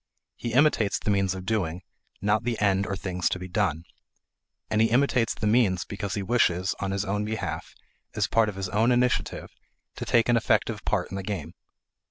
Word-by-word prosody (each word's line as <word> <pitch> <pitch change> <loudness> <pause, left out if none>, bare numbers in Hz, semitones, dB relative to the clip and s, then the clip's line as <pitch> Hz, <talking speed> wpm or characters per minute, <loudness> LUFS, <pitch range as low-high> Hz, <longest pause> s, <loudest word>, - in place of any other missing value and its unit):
He 120 -1 -5
imitates 130 -6 +3
the 105 - -1
means 95 -1 +1
of 95 0 -7
doing, 95 -5 -1 0.4
not 105 +2 +2
the 120 -1 -2
end 100 -1 +2
or 100 - -2
thing 90 -1 -5
to 90 - +1
be 90 0 -7
done. 90 -5 0 0.8
And 110 0 +1
he 115 - +4
imitates 125 -2 +2
the - - -4
means 105 -5 +3
because 100 -1 -4
he 100 - -2
wishes, 95 -5 +2
on 100 - -2
his 100 +1 -1
own 105 +2 -1
behalf, 95 -7 -4 0.4
as - - +2
part 115 -1 +2
of 105 - -7
his 95 -1 -3
own 110 +5 +2
initiative, 125 0 0 0.5
to - - -4
take 115 -2 +3
an 120 -1 +4
effective 115 - +1
part - - 0
in 95 - -4
the - - -3
game. 95 -5 -5
100 Hz, 200 wpm, -26 LUFS, 95-115 Hz, 0.8 s, he